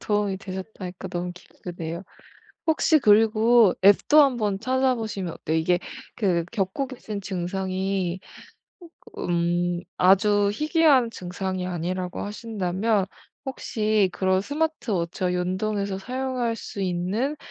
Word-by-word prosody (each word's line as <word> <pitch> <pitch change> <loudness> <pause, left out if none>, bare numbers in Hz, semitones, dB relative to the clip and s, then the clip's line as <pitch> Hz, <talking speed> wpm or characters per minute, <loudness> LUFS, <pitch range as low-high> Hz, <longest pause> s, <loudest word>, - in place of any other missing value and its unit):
도움이 205 -2 0
되셨다니까 190 -1 -7
너무 175 0 -3
기쁘네요. 175 -1 -7 0.7
혹시 315 0 +4
그리고 220 -1 +5
앱도 205 +10 +6
한번 225 -8 +1
찾아보시면 225 -7 -1
어때요? 160 +1 -2
이게 175 +2 +2 0.4
그 180 -6 +1
겪고 195 +7 -1
계신 220 -5 -6
증상이 190 0 -2 1.0
음 175 0 0 0.2
아주 200 +2 +4
희귀한 300 - +3
증상이 185 -1 -4
아니라고 180 +1 -3
하신다면 205 -1 -1 0.4
혹시 215 -6 0
그런 190 0 +1
스마트 310 +1 -2
워치와 180 0 -1
연동해서 195 +2 -1
사용할 250 +1 -2
수 205 - -7
있는 190 +10 -1
195 Hz, 265 characters per minute, -25 LUFS, 180-230 Hz, 1.0 s, 앱도